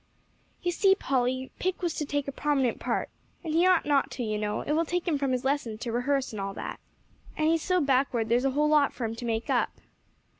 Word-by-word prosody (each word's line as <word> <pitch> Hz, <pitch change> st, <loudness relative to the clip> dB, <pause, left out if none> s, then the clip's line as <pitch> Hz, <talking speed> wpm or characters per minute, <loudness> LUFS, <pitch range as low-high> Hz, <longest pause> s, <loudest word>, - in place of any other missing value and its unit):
"You 350 Hz, -, +1 dB
see, 385 Hz, +2 st, +4 dB
Polly, 260 Hz, -4 st, -1 dB
Pick 370 Hz, 0 st, -2 dB
was 340 Hz, -3 st, 0 dB
to 300 Hz, -, -2 dB
take 285 Hz, 0 st, -2 dB
a -, -, -2 dB
prominent 270 Hz, -4 st, 0 dB
part, -, -, -1 dB, 0.3 s
and 320 Hz, -2 st, -3 dB
he 340 Hz, +3 st, +4 dB
ought 365 Hz, -3 st, +4 dB
not 285 Hz, -2 st, +2 dB
to, 250 Hz, -, -2 dB
you 215 Hz, -2 st, -1 dB
know; 210 Hz, 0 st, -2 dB
it -, -, -3 dB
will 320 Hz, +2 st, +3 dB
take 355 Hz, +3 st, -2 dB
him 305 Hz, -4 st, +1 dB
from 275 Hz, -2 st, 0 dB
his 255 Hz, 0 st, -1 dB
lessons 265 Hz, -6 st, -1 dB
to 240 Hz, -, -3 dB
rehearse 265 Hz, +3 st, 0 dB
and 205 Hz, -, -4 dB
all 195 Hz, 0 st, -4 dB
that. -, -, -6 dB, 0.6 s
And 310 Hz, -, +2 dB
he's 325 Hz, 0 st, +2 dB
so 365 Hz, +1 st, +1 dB
backward 260 Hz, -5 st, +1 dB
there's 240 Hz, +2 st, +2 dB
a 270 Hz, -, +3 dB
whole 300 Hz, 0 st, +3 dB
lot 300 Hz, -2 st, +4 dB
for 240 Hz, -, -4 dB
him 225 Hz, -, -2 dB
to 235 Hz, +1 st, -7 dB
make 225 Hz, -1 st, -1 dB
up." -, -, +2 dB
275 Hz, 240 wpm, -28 LUFS, 245-310 Hz, 0.6 s, see